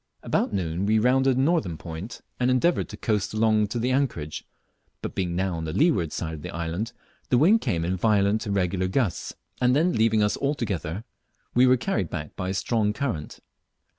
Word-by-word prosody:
About -, -, 0 dB
noon 90 Hz, -1 st, -1 dB
we 110 Hz, +1 st, +3 dB
rounded 130 Hz, +3 st, +3 dB
the -, -, +3 dB
northern 135 Hz, -, +1 dB
point, 85 Hz, +7 st, -7 dB, 0.2 s
and 125 Hz, 0 st, +2 dB
endeavoured 130 Hz, +7 st, +2 dB
to -, -, -8 dB
coast 105 Hz, -2 st, -1 dB
along 110 Hz, -1 st, +3 dB
to 110 Hz, -, -4 dB
the 120 Hz, +2 st, 0 dB
anchorage; 115 Hz, -, -1 dB, 0.6 s
but -, -, -4 dB
being 90 Hz, -2 st, -2 dB
now 95 Hz, 0 st, 0 dB
on 80 Hz, -, -4 dB
the 80 Hz, -, -4 dB
leeward 140 Hz, -, +2 dB
side 80 Hz, -2 st, -4 dB
of 80 Hz, -, -7 dB
the -, -, -6 dB
island, 85 Hz, +7 st, -3 dB, 0.4 s
the 125 Hz, -, +4 dB
wind 195 Hz, -, +5 dB
came 85 Hz, -1 st, -1 dB
in 95 Hz, +2 st, -1 dB
violent 105 Hz, +2 st, +2 dB
irregular 95 Hz, -2 st, 0 dB
gusts, 95 Hz, -2 st, -1 dB, 0.3 s
and 125 Hz, +1 st, +4 dB
then 170 Hz, +5 st, +3 dB
leaving 110 Hz, -1 st, +3 dB
us 105 Hz, -, +1 dB
altogether, 105 Hz, -, -2 dB, 0.5 s
we 125 Hz, +1 st, +5 dB
were 130 Hz, 0 st, +5 dB
carried 115 Hz, -, -1 dB
back 75 Hz, -1 st, -6 dB
by 95 Hz, 0 st, -3 dB
a -, -, -1 dB
strong 105 Hz, 0 st, +1 dB
current. 105 Hz, -, -4 dB
105 Hz, 195 wpm, -25 LUFS, 90-125 Hz, 0.6 s, wind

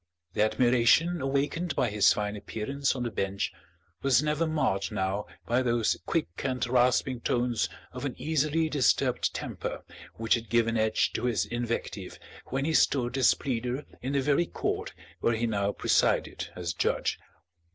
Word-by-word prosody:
The -, -, 0 dB
admiration 125 Hz, +9 st, +3 dB
awakened 140 Hz, +5 st, -1 dB
by 125 Hz, -4 st, +1 dB
his 105 Hz, -1 st, +5 dB
fine 105 Hz, 0 st, -1 dB
appearance 125 Hz, +8 st, -2 dB
on 125 Hz, -, -2 dB
the 120 Hz, -, -2 dB
bench 100 Hz, -1 st, -2 dB, 0.5 s
was 135 Hz, 0 st, +4 dB
never 150 Hz, +2 st, +1 dB
marred 120 Hz, -11 st, 0 dB
now 100 Hz, 0 st, -2 dB, 0.2 s
by 120 Hz, +2 st, +2 dB
those 120 Hz, -3 st, +1 dB
quick -, -, +1 dB, 0.2 s
and 130 Hz, -2 st, -1 dB
rasping 125 Hz, +1 st, +2 dB
tones 120 Hz, -1 st, 0 dB, 0.2 s
of -, -, -7 dB
an -, -, -3 dB
easily 155 Hz, +1 st, +1 dB
disturbed 145 Hz, -5 st, +2 dB
temper -, -, -5 dB, 0.3 s
which 115 Hz, 0 st, +1 dB
had 115 Hz, -2 st, -1 dB
given 115 Hz, 0 st, +2 dB
edge 110 Hz, -1 st, +1 dB
to -, -, -2 dB
his 110 Hz, -6 st, +1 dB
invective 115 Hz, -4 st, -4 dB, 0.3 s
when 135 Hz, +1 st, -1 dB
he 160 Hz, -, 0 dB
stood 125 Hz, -5 st, +2 dB
as 130 Hz, -3 st, +5 dB
pleader 125 Hz, +2 st, -3 dB, 0.2 s
in 135 Hz, +2 st, -3 dB
the 140 Hz, -, +2 dB
very 145 Hz, +5 st, +2 dB
court -, -, -3 dB, 0.3 s
where 115 Hz, -, +2 dB
he 115 Hz, +1 st, 0 dB
now 100 Hz, -3 st, 0 dB
presided -, -, +1 dB
as 85 Hz, -1 st, -3 dB
judge. -, -, 0 dB
120 Hz, 160 wpm, -28 LUFS, 110-140 Hz, 0.5 s, his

